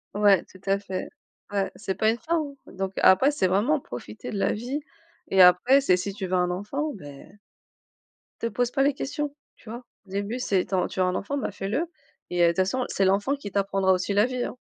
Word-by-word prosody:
Ouais, 205 -3 +5
tout 185 - -18
à 195 0 +3
fait. 190 -2 -5 0.4
Ouais, 200 -1 -1
c'est 190 - -4
pas 220 - +2
une 235 - -4
fin, 330 +9 -1
hein. 290 -2 -4 0.2
Donc 190 0 -4
après, 260 +10 +6
c'est 280 -10 +1
vraiment 215 +12 +2
profiter 115 - -8
de 205 - -3
la - - +1
vie 250 +7 -3 0.5
et 190 - +5
après 180 +10 +7
c'est 185 -9 +4
si 195 +2 -4
tu 195 -1 -5
veux 185 - -5
un 180 -1 +2
enfant, 275 +12 -3
beh 145 -8 -11 1.2
te 230 - 0
pose 245 +3 0
pas 270 0 +2
les 280 0 +3
questions 290 +1 -4 0.2
tu 220 - -15
vois? 240 +3 -7 0.2
Au - - -19
début 200 +5 -3
c'est 195 -7 +1
tu 195 - -2
as 180 - +1
tu - - -7
veux 185 - +4
un 180 0 0
enfant? 280 +8 -2
Bah 265 - -2
fais-le 210 - -2 0.4
et 175 - +1
heu, - - +7
de - - +4
toute 170 - -10
façon, 195 +7 +1
c'est 195 - +1
l'enfant 200 +9 +2
qui 275 -8 -8
t'apprendra 195 -1 +1
aussi 185 +2 -1
la 205 +2 +4
vie, 250 -1 -2
hein. - - -7
200 Hz, 235 wpm, -26 LUFS, 185-255 Hz, 1.2 s, après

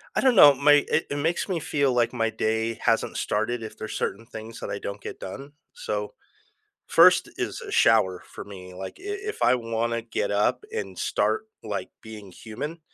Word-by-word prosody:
I - - +2
don't 260 -3 +4
know. 145 -6 +9
My 145 +1 +5
it 160 - +1
it 145 - -2
makes 165 +4 0
me 185 -4 -1
feel 140 -4 +1
like 120 -1 +2
my 115 -2 0
day 110 +1 -1
hasn't - - +1
started 110 +2 -1
if 110 - -8
there's 110 - -6
certain 110 +4 -3
things 115 -1 -9
that - - -6
I 100 - -3
don't 100 0 -6
get - - -8
done. 135 +10 -8 0.2
So, - - -4 0.7
1st - - +6
is - - -3
a 410 - -8
shower 110 - +3
for - - -9
me, 90 -2 -11
like, 95 +1 -8
i - - -15
if 410 +1 -4
I 125 - +5
wanna 115 0 -2
get 115 -2 -2
up 105 - +1
and 455 - -5
start, 440 0 0 0.2
like, - - -4
being 105 -4 -10
human, 145 +10 -7
115 Hz, 195 wpm, -25 LUFS, 110-150 Hz, 0.7 s, know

